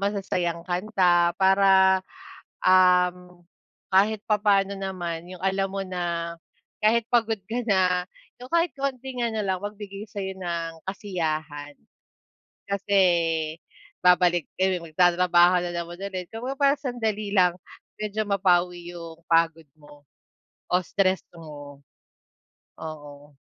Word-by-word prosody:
masasayang 190 -4 -1
kanta 180 -2 +2
para, 190 -1 +5 0.6
um, 180 -1 +3 0.5
kahit 205 +3 +4
papaano 200 -2 +2
naman 175 -3 -5
yung 185 -1 -10
alam 195 0 0
mo 195 - -4
na 170 -2 -3 0.5
kahit 225 +2 +3
pagod 225 -2 +2
ka 235 +4 -3
na, 180 -2 +3 0.4
yung 250 - -10
kahit 335 0 +2
konting 265 -2 -4
ano 225 -2 -1
lang, 190 -1 -1
magbigay 205 -1 -7
sa'yo 190 -2 -5
ng 170 -3 -5
kasiyahan. 155 -7 -4 0.9
Kasi 200 0 -1 1.0
babalik 175 -2 +3
kayo 185 -2 +1
magtatrabaho 175 +1 +4
na 175 - -3
naman 170 +1 -5
ulit, 185 -3 -5
kumbaga, 250 +4 -4
parang 280 0 +2
sandali 220 -5 -2
lang 180 -2 +5 0.5
medyo 215 0 -2
mapawi 180 -3 +1
yung 165 -1 -9
pagod 165 -1 +2
mo 145 -1 -18 0.6
o - - +1
stress 185 0 0 0.2
mo. 145 -3 -11 1.0
Oo. 145 -2 -10
185 Hz, 110 wpm, -25 LUFS, 170-200 Hz, 1.0 s, para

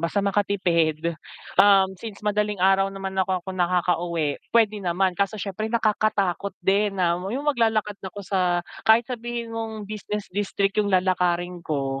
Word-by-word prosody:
basta 180 +5 0
makatipid. 170 -5 +1 0.5
Um, 195 -1 +5
since 215 -2 -8
madaling 210 -2 0
araw 195 0 +4
naman 195 0 -6
ako 185 -1 -1
ako - - -10
nakakauwi, 175 -4 0
puwede 215 -3 +2
naman. 185 +1 +1
Kaso 200 +3 -1
siyempre 205 +1 -4
nakakatakot 210 -4 0
din 200 +1 +2
na 175 -2 +2 0.2
'yong 265 +7 -3
maglalakad 220 -7 +1
na 190 - -6
ako 205 - -9
sa 190 0 0 0.5
kahit 225 +2 +6
sabihin 240 -1 -5
mong 220 -2 -5
business 210 -1 -6
district 200 +1 0
'yong 205 - 0
lalakarin 180 -1 +1
ko, 135 -4 -2
195 Hz, 150 wpm, -24 LUFS, 180-210 Hz, 0.5 s, kahit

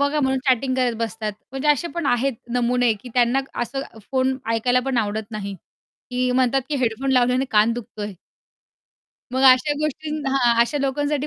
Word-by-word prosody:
बघा 285 +1 +1
म्हणून 265 -1 +1
चॅटिंग 260 +1 +2
करत 250 -2 +1
बसतात, 225 -2 -3 0.2
म्हणजे 270 +3 -2
असे 295 +3 +2
पण 340 - -2
आहेत 255 +3 +2 0.2
नमुने 245 -1 +2
की 250 - -10
त्यांना 245 +2 +3 0.2
असं 270 +3 -3 0.3
फोन 260 0 +1 0.2
ऐकायलापण 250 +3 +1
आवडत 215 0 -2
नाही. 200 -2 -5 0.6
की 250 0 0
म्हणतात, 260 +1 +2
की 295 - -1
हेडफोन 255 +2 -1
लावल्याने 250 +1 +3
कान 215 +2 +4
दुखतोय. 215 -3 -6 1.2
मग 260 +1 0
अशा 275 +4 +1
गोष्टी 305 0 -3 0.2
हां, 245 -3 +3
अशा 285 +5 +2
लोकांसाठी 290 +1 -1
255 Hz, 160 wpm, -22 LUFS, 235-270 Hz, 1.2 s, कान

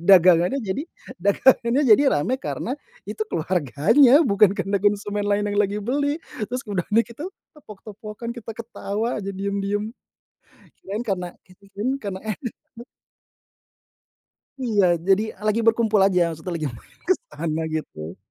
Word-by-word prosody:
Dagangannya 180 +4 +6
jadi 195 +8 -2 0.4
dagangannya 235 +6 +3
jadi 230 +3 +6
rame 150 - 0
karena 245 - -3 0.3
itu - - -8
keluarganya, 190 - +4
bukan 200 -3 +4
karena 195 0 -1
konsumen 205 0 0
lain 205 0 +1
yang 205 - -1
lagi 200 0 0
beli. 285 +4 0 0.3
Terus 250 +2 -4
udahnya 205 +1 +1
gitu, 290 +10 -7 0.3
tepok-tepokan, 215 -1 -9
kita 225 -2 -9
ketawa 225 -1 -3
aja 195 - -6
diem-diem. 200 +2 -2 0.9
Kirain 210 +5 -4
karena 180 -3 -2 0.2
kita 185 +1 -21
kirain 210 +6 -2
karena 195 -3 -4 0.5
enak. 235 +1 -13 1.7
Iya, 220 -7 +2
jadi 195 +4 +2 0.2
lagi 215 +2 +2
berkumpul 225 -2 +3
aja. 190 -2 +3
Maksudnya 160 +3 -6
lagi 155 -2 -2
main - - -18
ke 375 - +6 0.2
sana 160 -1 -3
gitu. 85 - -5
205 Hz, 130 wpm, -23 LUFS, 190-230 Hz, 1.7 s, Dagangannya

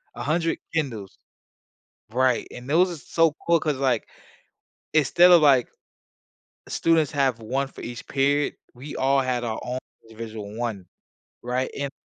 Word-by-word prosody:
100 165 +6 0 0.2
Kindles. 115 - -3 1.0
Right. 130 -1 +2
And 125 +2 -10
those 180 +5 +4
are 170 - -5
so 165 0 +2
cool 170 -1 +4
'cause, 150 -3 -1
like, 130 -4 0 0.9
instead 170 +4 +5
of, 170 -2 +8
like, 135 -5 +5 1.0
students 165 -3 +2
have 135 -4 +1
one 135 +5 -2
for - - -13
each 120 -1 -7
period, 140 +1 +1 0.2
we 135 +5 -8
all 135 +1 +3
had 125 -2 -1
our 110 -2 -3
ow 125 +1 -2 0.3
individual 110 -2 -8
one, 110 -7 -3 0.6
right? 125 +2 -1
And 140 -1 -2
135 Hz, 140 wpm, -24 LUFS, 120-150 Hz, 1.0 s, of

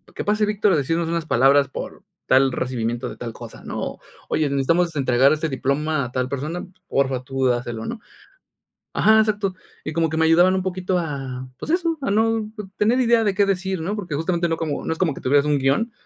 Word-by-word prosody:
¿qué - - -3
pase 210 +1 +2
Víctor 210 -1 +2
a 160 - +3
decirnos 165 +4 0
unas 170 -1 -1
palabras 140 0 +4
por - - -7 0.2
tal 135 +1 +4
recibimiento 120 -1 -2
de - - -9
tal 115 -2 -6
cosa? - - -11
¿no? - - -5 0.3
Oye, 150 -2 +1
necesitamos 165 +5 +1
entregar 135 +1 +4
este 155 +1 -2
diploma 140 +2 -1
a 120 - -8
tal 125 0 -1
persona, 150 +7 -4 0.2
por 135 -1 +1
fa, 130 -1 -3
tú 135 0 -2
dáselo, 120 -2 -2
¿no? 235 - -5 1.0
Ajá, 220 0 +5
exacto. 205 -3 0 0.3
Y 155 - -4
como 165 -1 +1
que 160 - -2
me 160 - +4
ayudaban 175 +3 +5
un 185 - 0
poquito 185 0 -1
a, 135 -6 -5
pues, - - -6
eso, 335 -2 0
a 200 - -1
no 220 +1 +1 0.3
tener 230 +5 +2
idea 235 -2 +3
de 205 - +2
qué 200 +1 +3
decir, 190 -2 -1
¿no? 200 +6 -2
Porque, 175 -7 -5
justamente 170 +2 0
no 165 - -1
como, 155 -3 -3
no - - -1
es 160 - -4
como 165 -7 +1
que - - -10
tuvieras 140 +2 +3
un 145 -1 +2
guión. 140 - +1
160 Hz, 215 wpm, -22 LUFS, 135-190 Hz, 1.0 s, Ajá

